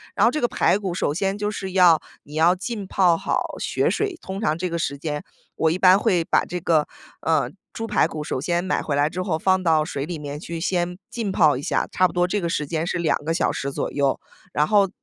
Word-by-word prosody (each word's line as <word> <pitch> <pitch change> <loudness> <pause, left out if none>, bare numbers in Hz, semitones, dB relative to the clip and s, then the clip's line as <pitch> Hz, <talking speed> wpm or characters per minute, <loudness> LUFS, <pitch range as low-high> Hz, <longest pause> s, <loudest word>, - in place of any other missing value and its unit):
然 - - +2
后 235 - +4
这 305 - -2
个 240 - +2
排 200 - +2
骨 190 -4 -3
首 155 -4 0
先 195 +5 -1
就 210 0 -2
是 190 -2 -5
要 175 -4 +6 0.2
你 145 - -14
要 170 +3 +4
浸 200 +1 -5
泡 180 -4 +3
好 - - -2
血 - - 0
水。 420 - 0
通 190 +1 -6
常 155 -7 +1
这 180 +1 -2
个 170 - -2
时 140 -3 -2
间， 150 0 -4 0.3
我 160 -1 +2
一 175 - 0
般 185 0 +6
会 185 -6 +2
把 - - +2
这 180 +1 -4
个， 160 -3 +2 0.3
嗯， 160 +2 0 0.2
猪 225 - -4
排 - - +2
骨 155 -1 -5
首 130 - -3
先 175 +3 0
买 185 - 0
回 145 - -2
来 145 +2 +2
之 185 +2 -4
后 160 -5 -1
放 185 +1 +2
到 160 -3 +3
水 140 -2 -4
里 170 -1 -5
面 145 0 -6
去 165 0 -6
先 180 0 -1
浸 220 -5 -3
泡 155 -7 +4
一 - - -5
下， - - 0
差 185 - +3
不 - - -10
多 180 0 +2
这 205 +3 -1
个 170 - -1
时 150 - -1
间 160 0 -2
是 175 - -2
2 165 - +2
个 165 - 0
小 - - +1
时 140 0 -3
左 - - -3
右。 140 -2 +1 0.3
然 150 +1 +2
后 200 -2 +4
175 Hz, 270 characters per minute, -23 LUFS, 155-190 Hz, 0.3 s, 要